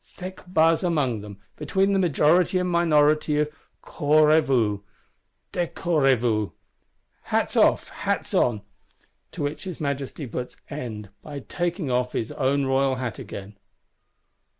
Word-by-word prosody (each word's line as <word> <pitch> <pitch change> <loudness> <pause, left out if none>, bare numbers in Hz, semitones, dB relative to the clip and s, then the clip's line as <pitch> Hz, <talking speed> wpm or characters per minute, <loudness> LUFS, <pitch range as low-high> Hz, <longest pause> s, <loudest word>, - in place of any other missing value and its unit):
Thick 185 0 -8
buzz 165 -1 +3
among 145 - 0
them, 100 -1 -10 0.2
between 195 +5 +1
majority 175 +2 +3
and 180 0 0
minority 155 -3 +3
of 150 0 +1 0.3
Couvrezvous, 145 -8 +3 0.7
Décrouvrez 160 -6 +1
vous 110 -3 0 0.7
(Hats - - 0
off, - - +3
Hats - - -3
on)! 110 -4 +2 0.7
To - - -4
which 150 +3 -4
his 180 -4 -6
Majesty 140 0 -3
puts 125 +1 -6
end, 110 -8 -6
by 145 -2 -7
taking 175 -1 -3
off 125 0 0
his 110 - -2
own 140 +1 +1
royal 135 0 +2
hat 125 -3 -4
again. 100 +1 -9
145 Hz, 125 wpm, -24 LUFS, 125-165 Hz, 0.7 s, buzz